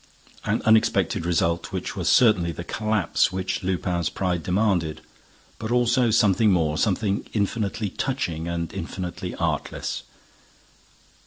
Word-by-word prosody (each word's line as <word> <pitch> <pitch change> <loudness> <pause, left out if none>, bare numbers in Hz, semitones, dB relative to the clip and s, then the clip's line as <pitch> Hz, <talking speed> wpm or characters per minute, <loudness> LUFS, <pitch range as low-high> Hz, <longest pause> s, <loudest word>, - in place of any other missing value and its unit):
An - - 0
unexpected 110 -6 +3
result, 85 0 0
which - - -4
was - - -1
certainly 100 -8 +4
the 85 - -6
collapse 105 -1 +1
which 95 0 -2
Lupin's 90 -2 -1
pride 90 -3 -1
demanded, 90 -3 0 0.6
but 110 -1 -4
also 120 0 +3
something 105 -1 +4
more, 80 -5 +2
something 100 -1 0
infinitely 105 -1 -1
touching 95 - -2
and 85 -1 -3
infinitely 90 -2 -5
artless. - - -2
95 Hz, 115 wpm, -24 LUFS, 85-110 Hz, 0.6 s, certainly